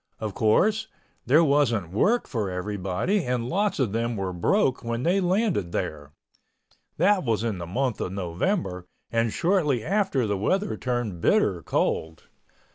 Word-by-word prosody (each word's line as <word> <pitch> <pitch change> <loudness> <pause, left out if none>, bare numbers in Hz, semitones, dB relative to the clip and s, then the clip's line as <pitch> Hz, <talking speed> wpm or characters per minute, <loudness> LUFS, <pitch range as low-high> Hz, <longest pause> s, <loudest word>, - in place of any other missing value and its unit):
Of 110 -2 -4
course, 210 - +2 0.4
there 150 +7 +6
wasn't 125 - +2
work 215 - +2
for 110 -6 -2
everybody 100 - -1
and 125 -2 -1
lots 200 +7 0
of 130 -7 0
them 115 +1 -1
were 95 -1 -3
broke 130 - +1
when 115 +1 -3
they 185 +3 +2
landed 185 - 0
there—that 115 - -3
was 115 -4 0
in 110 -5 -2
the 85 - -6
month 125 +5 -1
of - - -3
November 90 - -2 0.2
and 115 -1 +1
shortly 155 - +1
after 190 - +1
the 100 -2 -1
weather 195 - 0
turned 120 -8 -3
bitter - - +2
cold. 80 0 -1
115 Hz, 145 wpm, -25 LUFS, -, 0.4 s, there